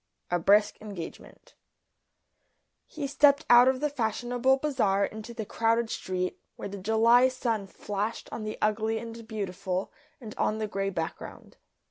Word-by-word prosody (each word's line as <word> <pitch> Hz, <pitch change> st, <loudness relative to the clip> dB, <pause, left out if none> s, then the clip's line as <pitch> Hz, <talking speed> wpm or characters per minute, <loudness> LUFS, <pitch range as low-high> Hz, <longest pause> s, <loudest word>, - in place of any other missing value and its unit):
A 175 Hz, -, +2 dB
BRISK 205 Hz, +4 st, +4 dB
ENGAGEMENT 200 Hz, -6 st, -9 dB, 1.3 s
He 300 Hz, -2 st, -5 dB
stepped 285 Hz, +1 st, +4 dB
out 240 Hz, +1 st, +8 dB
of 260 Hz, 0 st, +2 dB
the 300 Hz, -, +1 dB
fashionable 245 Hz, +1 st, +1 dB
bazaar 230 Hz, -9 st, +1 dB
into 220 Hz, +2 st, -8 dB
the 225 Hz, -2 st, -5 dB
crowded 230 Hz, +1 st, +1 dB
street, 185 Hz, -1 st, -3 dB, 0.2 s
where -, -, -6 dB
the 200 Hz, 0 st, -7 dB
July 225 Hz, +5 st, +5 dB
sun 230 Hz, -6 st, -2 dB
flashed 205 Hz, +3 st, -4 dB
on 220 Hz, -, -5 dB
the 215 Hz, 0 st, -5 dB
ugly 215 Hz, +1 st, +1 dB
and 230 Hz, 0 st, -8 dB
beautiful 195 Hz, -3 st, -3 dB, 0.3 s
and 220 Hz, -5 st, -9 dB
on 215 Hz, -, +1 dB
the 220 Hz, -, -2 dB
grey 195 Hz, -1 st, -2 dB
background. 165 Hz, -4 st, -6 dB
220 Hz, 145 wpm, -28 LUFS, 200-240 Hz, 1.3 s, out